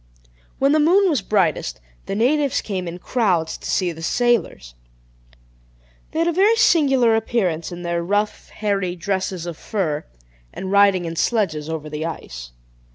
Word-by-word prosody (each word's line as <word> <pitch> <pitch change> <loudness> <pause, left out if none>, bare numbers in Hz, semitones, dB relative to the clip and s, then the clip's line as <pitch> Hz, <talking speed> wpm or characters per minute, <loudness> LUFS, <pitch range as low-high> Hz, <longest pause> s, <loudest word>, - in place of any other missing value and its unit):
When 275 +1 +3
the 310 - +4
moon 365 +5 +4
was 290 - +1
brightest, 160 - 0 0.3
the - - -3
natives 280 +5 +2
came 185 -4 -4
in 170 +1 -5
crowds 180 -6 0
to - - -7
see 180 -2 +1
the 165 0 -10
sailors. 205 - 0 1.4
They - - -7
had 330 +1 +2
a 340 - +1
very 400 +6 +4
singular 270 - +4
appearance 190 -8 -1
in 175 0 -7
their 170 0 -1
rough, 205 +4 -1
hairy 195 -4 -2
dresses 190 -1 -3
of 170 -3 -6
fur, 160 -8 -2 0.5
and 190 - -6
riding 200 -3 +4
in 165 0 -4
sledges 165 -7 0
over 160 -1 -4
the 155 +2 -4
ice. - - -8
195 Hz, 160 wpm, -21 LUFS, 165-240 Hz, 1.4 s, the